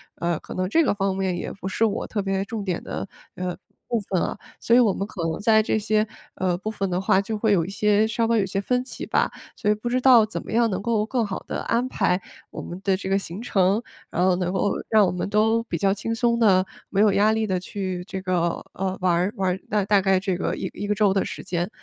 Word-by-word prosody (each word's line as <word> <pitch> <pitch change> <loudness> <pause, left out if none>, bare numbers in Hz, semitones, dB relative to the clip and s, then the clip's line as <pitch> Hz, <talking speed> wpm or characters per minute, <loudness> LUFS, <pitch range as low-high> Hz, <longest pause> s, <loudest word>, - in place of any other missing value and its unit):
呃， 170 -1 -1
可 - - -9
能 185 0 -1
这 330 +8 +4
个 - - +2
方 195 -1 -1
面 190 -2 -1
也 - - -4
不 190 -1 -7
是 220 - 0
我 210 - -1
特 205 - -2
别 195 0 -1
重 220 -2 -4
点 180 -3 -3
的， - - -5 0.3
呃， 180 -1 -4 0.3
部 235 - 0
分 190 -3 -1
啊。 - - -2 0.2
所 235 - +3
以 - - +7
我 215 -6 +4
们 195 - -3
可 180 - -7
能 160 - -3
在 220 +1 +4
这 215 - 0
些， 215 0 +1 0.3
呃， 180 -2 0
部 215 +3 -4
分 195 -3 -2
的 180 +1 0
话 190 0 +3
就 215 +2 -4
会 215 0 +1
有 165 -4 +2
一 - - -6
些 210 +1 +2
稍 225 +1 0
稍 230 - +2
有 200 - +3
一 - - -1
些 195 +1 -2
分 250 +4 0
歧 - - -7
吧。 - - +1 0.2
所 210 - -1
以 - - +2
不 215 +3 -6
知 255 +1 +1
道 245 -4 +7
怎 220 - -5
么 - - -9
样 230 0 +3
能 190 0 -2
够 220 -1 +1
更 235 -1 0
好 190 -2 -4
地 - - -3
安 240 +2 0
排 180 -5 +1 0.3
我 - - -6
们 175 +2 -7
的 195 -1 +2
这 190 -1 -5
个 195 - +3
行 190 +3 -7
程， 195 -1 +2 0.3
然 180 - 0
后 185 -1 +4
能 180 -1 -1
够 200 +1 +1 0.2
让 215 -2 +5
我 - - 0
们 180 +2 -3
都， 220 +2 +2
比 170 -7 -3
较 195 +3 +2
轻 225 +3 -3
松 235 0 +2
地、 190 -4 +4 0.2
没 195 - -1
有 210 -2 +5
压 210 +2 +4
力 220 0 0
地 185 -1 0
去 185 -1 -4
这 190 -2 -5
个， 175 -2 0
呃， 190 0 -2
玩 180 -2 +3
儿 180 +5 +1
玩 190 -1 +1
儿 190 - -6
那 210 -1 +1
大 200 -1 +4
概 190 -1 +3
这 190 -2 -1
个 - - -1
一 - - -4
1 205 - -5
个 210 - +2
周 200 -2 +3
的 195 - +1
时 - - -6
间。 175 +1 -2
200 Hz, 290 characters per minute, -24 LUFS, 185-220 Hz, 0.3 s, 以